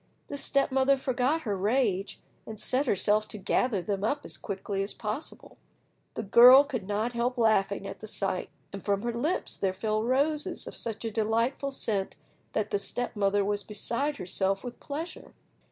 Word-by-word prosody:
The 285 - -4
step 275 0 +1
mother 270 +1 +3
forgot 260 +4 0
her 210 -8 -2
rage, 200 -1 0 0.3
and 220 -1 -7
set 260 +6 +1
herself 210 +1 +2
to 215 - -8
gather 205 0 0
them 200 0 -2
up 285 +7 -1
as - - -6
quickly 195 -1 -4
as 195 - -3
possible. 220 +7 -6 0.6
The 225 - -3
girl 245 +6 +9
could 250 -9 -5
not 215 +4 -1
help 245 +2 -1
laughing 200 -4 +2
at 195 - -7
the 215 - -8
sight, 195 -3 -1 0.2
and 200 - -7
from 200 0 0
her 235 0 -1
lips 295 +10 -1
there 190 -1 -1
fell 215 +1 0
roses 280 +6 0
of - - -8
such 225 0 -3
a 225 - -2
delightful 230 +6 0
scent 210 -7 -2 0.4
that 215 -1 -1
the 205 - +1
step 245 +5 -3
mother 200 -1 +2
was 205 0 0
beside 235 +8 -2
herself 190 +1 -1
with 245 -1 -7
pleasure. 310 +4 -6
220 Hz, 180 wpm, -28 LUFS, 200-260 Hz, 0.6 s, girl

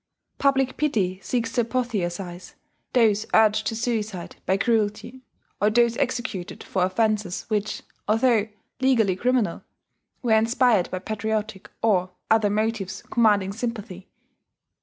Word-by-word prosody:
Public 270 -2 +2
pity 200 -11 0
seeks 230 0 -2
to 245 - +2
apotheosize 190 -7 -3 0.4
those 220 -3 +3
urged 215 0 +4
to 225 - -2
suicide 220 -6 -3
by 190 +2 +3
cruelty, 225 +3 -1 0.4
or 210 - +4
those 235 +1 +3
executed 245 -9 -3
for 190 - -2
offences 205 -1 0
which, 210 -1 -2 0.2
although 225 0 +3 0.3
legally 235 -8 +3
criminal, 240 -3 0 0.6
were 235 -3 +3
inspired 225 -3 +3
by 185 - -3
patriotic 215 0 -3
or 185 -5 +2 0.2
other 220 -2 +4
motives 210 -2 -2
commanding 205 -4 +3
sympathy. 215 -5 -5
220 Hz, 115 wpm, -24 LUFS, 195-235 Hz, 0.6 s, urged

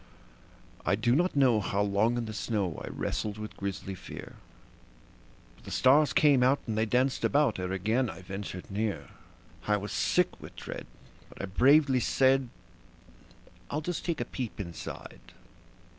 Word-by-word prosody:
I - - +2
do 120 +4 +2
not 175 +3 +1
know 130 -6 +4
how 100 0 0
long 105 +4 +2
in 120 - -2
the 110 - -6
snow 100 -6 -2
I - - -6
wrestled 105 -1 -3
with 110 0 -7
grisly 100 0 -4
fear; 90 - -9 1.2
But - - -21
the - - -8
stars 140 +3 +4
came 145 -4 +5
out 130 +3 +4
and 110 - -2
they 110 +1 +1
danced 125 +4 +1
about 140 -8 +2
ere 90 0 -3
again 110 +7 +1
I 95 - -9
ventured 95 0 -7
near; 105 -2 -2 0.6
I 105 0 +3
was 105 +1 -6
sick - - +1
with - - -11
dread, - - -7 0.4
but - - -15
I - - -2
bravely 135 +7 +4
said: 130 0 +3 1.2
"I'll 150 - -2
just 175 +2 -3
take 170 -3 -2
a 120 - -1
peep 125 -3 -5
inside. 85 -4 -7
110 Hz, 160 wpm, -29 LUFS, 100-130 Hz, 1.2 s, came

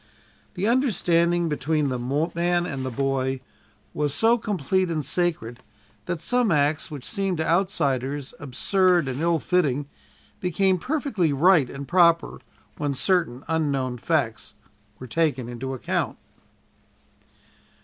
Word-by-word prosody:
The 185 +2 -2
understanding 175 -9 +2
between 150 -1 0
the 125 -1 -2 0.3
man 175 +1 +1
and 135 -4 -4
the 130 - -2
boy 135 0 -1 0.5
was 145 -1 -1
so 225 +8 +4
complete 190 - -1
and 155 -4 -2
sacred, 160 -10 -1 0.5
that 170 - -2
some 245 +5 +1
acts 150 -2 +1
which 145 -5 -7
seemed 195 -4 -1
to 160 - -1
outsiders 145 -7 0
absurd 175 +4 +1
and 130 +2 -3
ill 170 0 +2
fitting, 145 -5 0 0.5
became 185 +1 +1
perfectly 250 - 0
right 150 -1 +4
and 140 0 -7
proper 170 -2 +3 0.4
when 145 -2 -2
certain 150 -6 0
unknown 140 -6 -1
facts 135 -7 -1 0.4
were 130 - -9
taken 135 -2 0
into 125 +2 -5
account. 130 - -2
160 Hz, 125 wpm, -24 LUFS, 135-180 Hz, 0.5 s, so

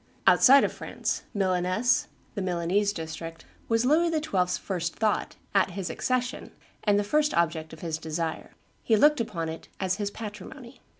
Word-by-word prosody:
Outside 275 +1 +7
of - - 0
France, - - -4
Milaness 190 +5 +1 0.3
[the 205 - -3
Milanese 185 +3 +1
district] 165 -2 -7 0.2
was 225 +1 +2
Louis 320 +5 +4
XII.'s 200 - 0
first 175 -3 -3
thought, 215 -2 0 0.2
at 195 -1 +3
his 185 -4 -3
accession, 255 -1 -2 0.3
and 205 -2 +3
the 205 - +2
first 300 +7 +1
object 160 -2 0
of 160 - -11
his 160 -2 -3
desire. 160 0 -4 0.3
He 225 - +3
looked 295 +4 +5
upon 175 -8 -3
it 160 0 -7
as 190 -1 0
his 205 -2 -2
patrimony. 220 +5 -9
200 Hz, 160 wpm, -27 LUFS, 170-235 Hz, 0.3 s, Outside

